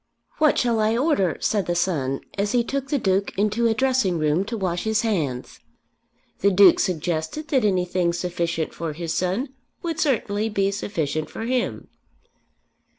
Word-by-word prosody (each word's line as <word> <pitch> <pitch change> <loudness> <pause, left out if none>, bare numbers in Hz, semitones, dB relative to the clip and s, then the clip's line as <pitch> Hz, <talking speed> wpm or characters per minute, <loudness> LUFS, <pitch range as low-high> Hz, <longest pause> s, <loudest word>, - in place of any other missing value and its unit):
"What 305 -2 +4
shall 235 -3 +1
I 220 +1 +2
order?" 245 - +1
said 205 -3 0
the 175 - 0
son 145 -7 0
as 200 +1 -1
he 240 -1 +3
took 275 +2 -3
the 290 - +1
Duke 195 -4 0
into 215 +3 +2
a 225 - +1
dressing 255 -8 +1
room 155 +3 +1
to 230 +2 -4
wash 180 -3 -2
his 220 -1 +1
hands. 155 - -2 0.8
The 200 - +4
Duke 190 -2 +6
suggested 175 - -2
that 265 -6 +2
anything 180 -3 +1
sufficient 170 -2 -2
for 165 -2 -4
his 165 +1 -4
son 190 +10 -1 0.3
would 330 -2 -3
certainly 220 -7 0
be 200 -2 +1
sufficient 155 -7 -3
for - - -6
him. 245 +1 -2
200 Hz, 160 wpm, -23 LUFS, 175-230 Hz, 0.8 s, Duke